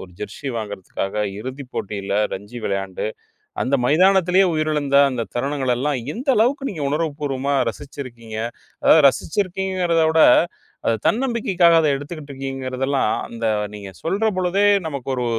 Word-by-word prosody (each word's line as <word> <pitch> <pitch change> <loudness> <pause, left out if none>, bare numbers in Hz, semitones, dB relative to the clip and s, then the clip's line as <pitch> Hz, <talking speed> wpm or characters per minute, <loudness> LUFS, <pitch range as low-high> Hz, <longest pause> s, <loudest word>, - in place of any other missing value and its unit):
ஒரு 90 - -16
ஜெர்ஸி 110 +7 -6
வாங்குறதுக்காக, 100 -2 -5 0.3
இறுதிப் 130 +2 -7
போட்டியில 100 0 -3 0.2
ரஞ்சி 105 +5 -8
விளையாண்டு, 95 0 -2 0.6
அந்த 135 +2 +1
மைதானத்திலேயே 185 +3 +4
உயிரிழந்த 150 -3 +1
அந்த 120 -3 -3
தருணங்கள் 135 0 0
எல்லாம் 140 0 0 0.2
எந்த 265 +4 -4
அளவுக்கு 270 +5 +2
நீங்க 155 -6 -5
உணர்வு 155 0 0
பூர்வமா 140 0 -1 0.2
ரசிச்சிருக்கீங்க. 120 -5 -9 0.5
அதாவது 155 -3 +6
ரசிச்சிருக்கீங்கங்கறத 185 -1 0
விட, 160 0 +4 0.7
அது 115 - +2
தன்னம்பிக்கைக்காக 205 -9 +3
அத 155 - +2
எடுத்துக்கிட்டு 145 0 -7
இருக்குங்றீங்கிறது 135 -1 -4
எல்லாம், 135 -6 +1 0.2
அந்த 115 -1 -5 0.3
நீங்க 100 -2 -8
சொல்றபொழுதே, 195 +1 +1 0.2
நமக்கு 140 -3 -5
ஒரு 125 - -2
140 Hz, 130 wpm, -21 LUFS, 120-175 Hz, 0.7 s, அதாவது